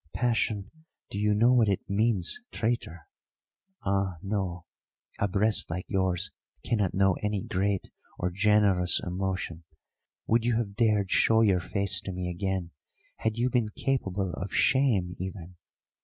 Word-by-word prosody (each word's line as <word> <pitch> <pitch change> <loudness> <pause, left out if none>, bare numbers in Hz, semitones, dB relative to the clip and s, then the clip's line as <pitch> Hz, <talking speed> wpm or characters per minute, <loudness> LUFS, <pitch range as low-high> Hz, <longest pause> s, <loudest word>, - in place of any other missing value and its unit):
Passion 110 -4 0 0.4
do 100 - -3
you 105 0 +2
know 120 +4 +5
what 115 -4 +4
it 100 - -1
means, 100 -3 +1
traitor? 110 -8 -2 0.8
Ah, 95 -2 0
no; 95 -4 -3 0.5
a 100 - +2
breast 105 +3 +1
like 90 +2 -4
yours 95 0 0 0.3
cannot 105 -5 0
know 95 0 +4
any 105 -2 -1
great 95 +1 -1 0.3
or 90 - -1
generous 100 -2 +3
emotion. 90 -2 -3 0.6
Would 115 0 +2
you 120 -1 +1
have 110 -3 -1
dared 105 -4 +2
show 110 0 +4
your 100 -5 +4
face 100 +3 0
to 95 - -5
me 90 -1 -3
again 95 -1 -2 0.5
had 110 0 -1
you 125 +2 +1
been 120 -4 +1
capable 100 -7 -2
of 95 - -5
shame 115 -10 +2
even? 90 -1 -7
100 Hz, 140 wpm, -28 LUFS, 90-110 Hz, 0.8 s, know